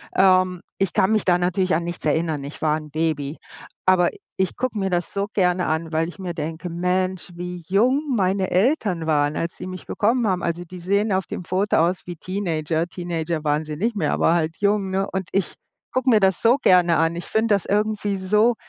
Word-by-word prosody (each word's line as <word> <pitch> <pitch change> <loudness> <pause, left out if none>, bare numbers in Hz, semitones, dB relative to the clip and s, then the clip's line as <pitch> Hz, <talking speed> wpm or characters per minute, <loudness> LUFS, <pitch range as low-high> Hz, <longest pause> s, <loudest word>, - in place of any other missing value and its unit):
Ähm, 185 -1 +4 0.2
ich 195 -2 0
kann 190 - +3
mich 215 -2 +1
da 180 -1 +3
natürlich 185 +1 +1
an 165 +2 +1
nichts 175 -2 -6
erinnern, 155 -1 0
ich 140 +2 -9
war 155 0 +2
'n 150 -1 -10
Baby, 155 -1 -1 0.5
aber 180 -2 +5 0.3
ich 190 -1 0
gucke 245 -3 -2
mir 195 -2 -1
das 175 -1 -1
so 200 0 -1
gerne 180 -2 +2
an, 160 +1 -1
weil 160 0 +1
ich 175 - -10
mir 180 -3 -5
denke: 160 +3 -4
„Mensch, 180 +1 -1
wie 180 0 -6
jung 255 - +2
meine 190 -2 +1
Eltern 190 - +1
waren, 145 -1 +2
als 170 +1 -3
sie 180 - -7
mich 185 -1 -8
bekommen 230 +2 +1
haben.“ 185 -3 0
Also, 170 +1 -2
die 180 +1 -10
sehen 200 +4 +1
auf 190 0 +1
dem - - -6
Foto 190 +4 +1
aus 175 +3 +1
wie 175 - -6
Teenager. 165 -3 -2
Teenager 170 -3 -3
waren 150 +1 0
sie 155 0 -5
nicht 220 +8 -1
mehr, 205 - 0
aber 165 - +3
halt 165 -1 0
jung, 200 -1 +1
ne? 195 +1 0
Und 190 -2 -3
ich 195 -2 -1 0.4
gucke 255 0 +1
mir 220 -3 +5
das 190 -2 +2
so 235 +2 +5
gerne 175 -2 +5
an. 165 +1 +1
Ich 175 - -6
finde 220 0 +1
das 200 - -2
irgendwie 210 0 0
so 210 +5 +2
180 Hz, 215 wpm, -22 LUFS, 165-200 Hz, 0.5 s, aber